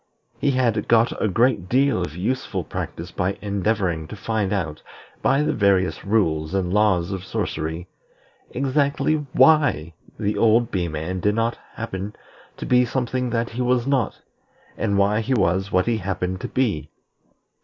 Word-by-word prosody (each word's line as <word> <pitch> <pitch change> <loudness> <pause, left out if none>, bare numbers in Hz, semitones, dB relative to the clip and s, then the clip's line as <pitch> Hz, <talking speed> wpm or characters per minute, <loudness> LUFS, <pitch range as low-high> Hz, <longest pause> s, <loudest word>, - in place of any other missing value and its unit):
He 145 - +1
had 120 -5 +1
got 115 0 +3
a - - +2
great 110 -2 +1
deal 135 -4 +2
of 80 -3 -4
useful 110 +9 -2
practice - - -6
by 95 +2 -1
endeavoring 100 -5 -1
to 105 - -8
find 105 0 -2
out, 80 -7 -2 0.4
by 140 +2 +3
the - - +1
various 100 -3 +2
rules 90 -6 0
and 90 -2 0
laws 100 -4 +2
of 95 -2 -4
sorcery, 80 -1 -3 0.6
exactly 140 +3 +1 0.2
why 145 - +4 0.3
the 105 +1 -1
old 115 +1 +3
Bee 90 -3 -1
man 80 +4 -4
did 105 +3 +1
not 115 +1 0 0.2
happen 105 -2 -5 0.4
to - - -5
be 125 0 +4
something 125 0 -1
that 115 0 -1
he 120 +2 -4
was 125 -1 +2
not, 135 -5 0 0.5
and 100 -2 0
why 100 +2 +3
he 130 +4 0
was 95 -2 +1
what 90 0 +2
he 115 -1 +1
happened 95 -1 -3
to - - -3
be. 100 - -1
105 Hz, 160 wpm, -23 LUFS, 90-120 Hz, 0.6 s, why